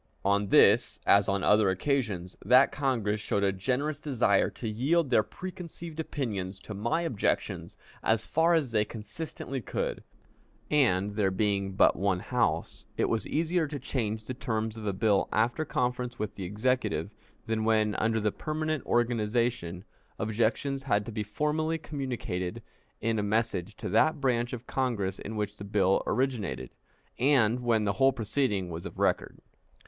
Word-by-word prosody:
On 100 +1 +2
this, - - +5
as 100 -1 +5
on 100 -1 0
other 105 -1 +4
occasions, 95 -4 -1
that 125 +6 +6
Congress 115 -7 0
showed 100 -1 0
a 100 - +3
generous 135 +10 -1
desire 125 -9 +2
to 115 - -7
yield 135 +7 +1
their 115 - +6
preconceived 170 - -8
opinions 105 -12 -3
to 105 - -8
my 115 +10 0
objections 145 -12 -1 0.2
as 110 -1 +1
far 165 +2 +3
as 145 -7 0
they 105 -2 +3
consistently 120 +5 -6
could, - - -3 0.7
and, 105 -9 +3
there 100 -2 +1
being 100 0 0
but 95 - +5
one 95 -1 +1
House, 115 +3 -1
it - - +1
was 115 - -1
easier 165 +1 +1
to 145 0 -5
change 110 -6 -3
the 130 - -4
terms 110 -3 -2
of 110 -2 -6
a - - +2
bill 100 +1 +2
after 120 +8 +1
conference 125 -2 -1
with 105 -1 -3
the 95 - -6
Executive 105 -3 -1 0.3
than 110 -1 -1
when, 110 -1 +2
under 110 +1 +1
the 105 -1 +1
permanent 155 +1 -2
organization, 115 -6 0 0.3
objections 115 +5 0
had 105 -7 +1
to 115 - -6
be 105 -1 -3
formally 150 +9 -1
communicated 125 - -4 0.4
in 115 0 0
a - - +1
message 105 -2 -1
to - - -6
that 155 -1 +3
branch 120 -3 +1
of 125 -1 -6
Congress 110 -8 -1
in 110 - -6
which 105 -1 -3
the - - -8
bill 100 -2 +2
originated, 125 -5 -1 0.5
and 125 -4 +3
when 115 -3 +2
the 100 -1 +1
whole 135 0 +7
proceeding 110 -6 -1
was 85 +1 -5
of - - -12
record. - - 0
110 Hz, 160 wpm, -29 LUFS, 105-135 Hz, 0.7 s, whole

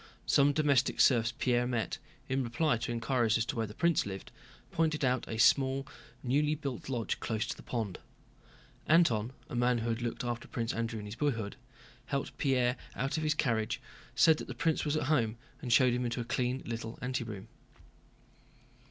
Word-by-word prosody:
Some 140 +1 +4
domestic 140 -3 +2
serfs 115 -3 +5
Pierre 120 -2 +2
met, 120 -3 -2 0.3
in 135 0 0
reply 120 +3 +1
to 115 +1 -3
inquiries 115 -1 +1
as 115 - 0
to - - -3
where 115 -2 -1
the 105 - -10
prince 170 -2 +3
lived, 95 -1 -7 0.4
pointed 155 -3 +1
out 125 0 +1
a 110 - -4
small 135 +4 +4 0.4
newly 145 +4 +2
built 140 -5 -5
lodge 120 -4 -2
close 110 -1 -1
to - - -4
the - - -12
pond. 110 -6 -3 0.9
Antón, 125 -10 +4 0.2
a - - -10
man 120 0 +2
who 115 0 -2
had 115 +1 -1
looked 120 0 -3
after 120 -1 -3
Prince 115 0 -2
Andrew 115 -1 -2
in 105 - -7
his 105 - -6
boyhood, 115 -8 -1 0.5
helped 140 -1 -2
Pierre 125 -3 +2 0.2
out 135 +4 -1
of - - -1
his 155 0 +2
carriage, 115 -7 0 0.4
said 160 -2 +6
that - - -7
the - - -6
prince 160 -2 +1
was 150 0 0
at 155 - 0
home, 120 -6 +1 0.2
and 125 -5 -4
showed 125 0 +5
him 125 +1 0
into 120 0 -2
a 120 - -3
clean 125 +2 -1
little 115 0 -5
anteroom. 115 -6 -3
125 Hz, 185 wpm, -31 LUFS, 115-140 Hz, 0.9 s, said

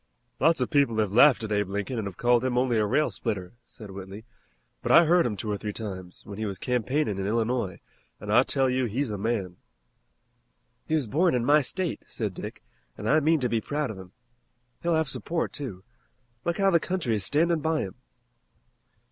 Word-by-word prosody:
"Lots 165 +1 +4
of 125 - -1
people 140 -6 +3
have 105 -3 +1
laughed 125 +2 +6
at 110 - -5
Abe 105 -2 0
Lincoln 105 +4 -3
an' 110 - -3
have 95 -3 -6
called 120 0 +3
him 125 -1 0
only 125 -3 +2
a 105 - +2
rail 150 +8 +2
splitter," 95 -6 -4
said 105 -3 -11
Whitley, 95 +3 -9 0.6
"but - - -1
I 170 - +8
heard 170 -2 +4
him 105 -4 -4
two 105 +2 -3
or 100 - -2
three 105 -1 -4
times, 95 -5 -7
when 105 -1 -8
he 110 - -2
was 100 -2 -4
campaignin' 125 -1 -1
in 95 - -2
Illinois, 115 -3 -1 0.4
an' 105 0 -5
I 120 +3 +7
tell 135 0 +2
you 130 0 +1
he's 120 +2 -2
a 105 - -4
man." 100 -5 -2 1.3
"He 160 - +1
was 150 -4 +1
born 160 - +2
in 120 -1 0
my 150 +3 +5
state," 175 +5 -1
said - - -3
Dick, - - -8 0.3
"and 105 - -5
I 155 +5 +5
mean 160 +1 +3
to 125 - +2
be 115 -2 0
proud 145 0 -2
of 100 - -9
him. 90 -1 -12 0.7
He'll 170 -1 +1
have 160 -1 +1
support, 165 +5 -2
too. 105 -11 -6 0.6
Look 170 0 0
how 195 -1 +3
the 170 - +5
country 170 -9 -1
is 105 - -2
standing 165 - +2
by 160 +1 0
him!" 95 - -5
120 Hz, 210 wpm, -27 LUFS, 105-150 Hz, 1.3 s, I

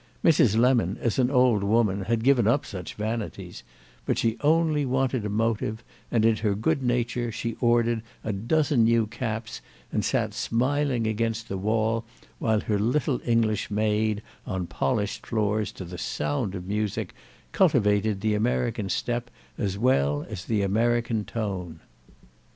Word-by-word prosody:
Mrs. 125 -9 +5
Lemon, 125 0 +3
as 120 +1 -1
an 125 -1 +3
old 125 -6 +4
woman, 100 -2 +2
had 115 +1 0
given 125 -4 +4
up 140 +5 +2
such 90 -4 -7
vanities; 105 -4 -4 0.4
but - - -1
she 115 -1 +1
only 155 0 +3
wanted 130 -2 0
a 105 - -2
motive, 110 +1 -1 0.3
and 110 -2 +2
in 115 -1 +4
her 105 -2 0
good 110 +6 0
nature 120 -1 0
she 115 +1 -3
ordered 120 -1 +2 0.2
a 110 - -2
dozen 125 +5 +2
new 115 -1 +3
caps 110 0 -5 0.3
and - - 0
sat - - 0
smiling 130 0 0
against 115 +1 -1
the 95 - -2
wall 110 +2 0 0.4
while 110 -2 +1
her 105 -3 -1
little 125 +4 +1
English 115 -3 +1
maid, 105 0 0 0.2
on 95 -1 -2
polished 105 +3 -2
floors, 105 -1 0
to 95 - -8
the 90 0 -8
sound 75 +7 -2
of 90 -1 -6
music, 105 +1 -2 0.4
cultivated 105 0 +2
the 110 0 +1
American 115 -1 0
step 120 +5 -2 0.3
as 100 -3 -2
well 75 - +2
as 100 -4 -7
the 105 -3 0
American 115 +2 +1
tone. 95 -6 -4
110 Hz, 150 wpm, -26 LUFS, 105-120 Hz, 0.4 s, Mrs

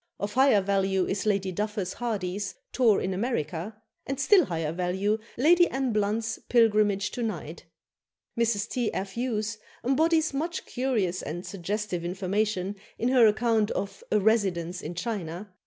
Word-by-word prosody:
Of 205 +1 -3
higher 260 -5 +5
value 195 -1 +1
is 200 +2 -2
Lady 195 -2 +1
Duffus 205 -1 -2
Hardy's 205 -4 -3 0.2
"Tour 230 -6 +4
in 190 - -2
America," 195 - -3 0.3
and 275 0 -3
still 360 +4 +5
higher 165 -5 -2
value 190 +5 0 0.2
Lady 345 +7 +5
Anne 265 -3 -1
Blunt's 215 +2 0
"Pilgrimage 210 -4 +3
to 245 - -5
Nijd." 175 -8 -4 0.8
Mrs. 225 -3 +1
T. 245 -3 -1
F. 195 0 -3
Hughes 225 -2 -2 0.2
embodies 315 +4 +2
much 330 +6 -3
curious 225 -9 -1
and 175 +4 -5
suggestive 195 -1 -3
information 195 +2 -1 0.2
in 240 - 0
her 250 -3 +6
account 220 0 +2
of 200 - -4
a 210 - +4
"Residence 190 -5 +1
in 175 - -6
China." 185 -2 -4
210 Hz, 145 wpm, -27 LUFS, 190-235 Hz, 0.8 s, her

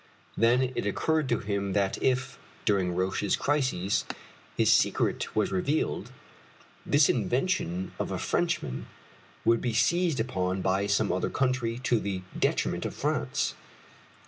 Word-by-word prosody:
Then 125 +3 +3
it 105 - -2
occurred 155 +7 0
to 120 - +2
him 100 -1 -2
that 100 -1 0
if, 130 0 0 0.3
during 95 -4 +1
Roch's 95 +2 0
crises, 130 -10 0 0.5
his - - +5
secret - - +1
was 105 -2 +1
revealed, 135 +12 -1 0.7
this 145 0 +4
invention 115 - 0
of - - -2
a - - -1
Frenchman 65 - -1 0.6
would 115 0 +4
be 120 -3 -1
seized 165 +5 +2
upon 95 -5 -1
by 95 +1 +1
some 100 +1 +2
other 95 - 0
country 125 -3 0
to 120 -2 +2
the 95 -3 -3 0.2
detriment - - 0
of - - -4
France. - - -1
110 Hz, 135 wpm, -28 LUFS, 95-130 Hz, 0.7 s, his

